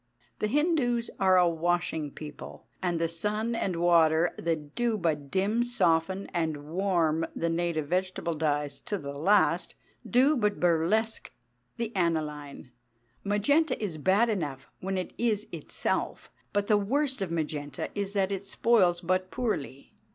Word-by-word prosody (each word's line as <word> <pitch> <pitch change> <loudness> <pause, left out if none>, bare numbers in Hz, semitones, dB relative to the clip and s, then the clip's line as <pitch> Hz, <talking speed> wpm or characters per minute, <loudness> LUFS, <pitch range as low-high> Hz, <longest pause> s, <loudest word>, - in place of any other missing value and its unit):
The 215 - +1
Hindus 260 -4 +1
are 190 -1 +5
a 180 -1 +5
washing 170 -2 0
people; 150 +1 -10 0.2
and 175 -2 0
the 165 - +1
sun 210 +7 -1
and 195 -5 -1
water 165 -1 +4
that 155 -3 -3
do 235 -2 0
but 155 -6 -1
dim, 205 +7 +1
soften, 185 -5 +1
and 160 -4 -2
warm 170 -4 +1
the 165 0 -1
native 165 -3 -1
vegetable 185 -1 -1
dyes 145 -2 -1
to 205 - -1
the 140 -5 -6
last, 190 +9 +2 0.3
do 265 +5 +4
but 210 -5 0
burlesque 180 +7 +1 0.5
the 230 -2 -4
aniline. 150 -7 -2 0.5
Magenta 255 +9 +2
is 180 -8 -4
bad 195 +9 +3
enough 150 - -3
when 190 0 -2
it 185 - -4
is 220 -3 +1
itself; 165 -4 -3 0.2
but 205 0 0
the 210 0 +4
worst 265 +4 0
of 190 - -1
magenta 150 -4 -3
is 200 -1 -3
that 195 -1 +1
it 195 0 -4
spoils 190 -6 +3
but 185 +1 0
poorly. 150 - -3
180 Hz, 145 wpm, -28 LUFS, 160-210 Hz, 0.5 s, are